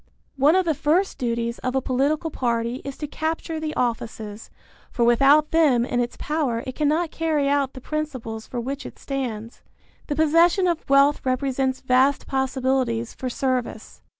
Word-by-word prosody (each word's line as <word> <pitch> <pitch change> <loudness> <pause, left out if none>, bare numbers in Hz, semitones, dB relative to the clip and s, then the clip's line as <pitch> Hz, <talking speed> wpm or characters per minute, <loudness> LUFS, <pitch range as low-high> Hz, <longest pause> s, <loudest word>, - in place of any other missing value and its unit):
One 285 +5 +4
of 375 -1 +3
the 325 - +2
first 330 +7 +1
duties 235 -1 -2
of 255 +1 -3
a - - +3
political 280 +5 0
party 235 -1 -1
is 275 -1 -7
to 300 - -4
capture 320 +2 -3
the 310 -1 -4
offices, 225 -3 -3 0.4
for 235 - 0
without 275 +6 +5
them 285 -8 +4
in 245 - -1
its 240 0 -2
power 275 -6 -1
it 260 - -5
cannot 310 +3 0
carry 310 -3 0
out 280 -1 +1
the 260 - -10
principles 255 -8 -5
for 245 - -4
which 270 +4 -4
it - - -10
stands. 240 -5 -5 0.5
The 290 - -2
possession 330 +5 +4
of 340 -4 -2
wealth 275 +1 +4
represents 265 0 -1
vast 260 +2 +2
possibilities 260 -3 -1
for 255 - -4
service. 250 -3 -3
270 Hz, 165 wpm, -23 LUFS, 245-305 Hz, 0.5 s, without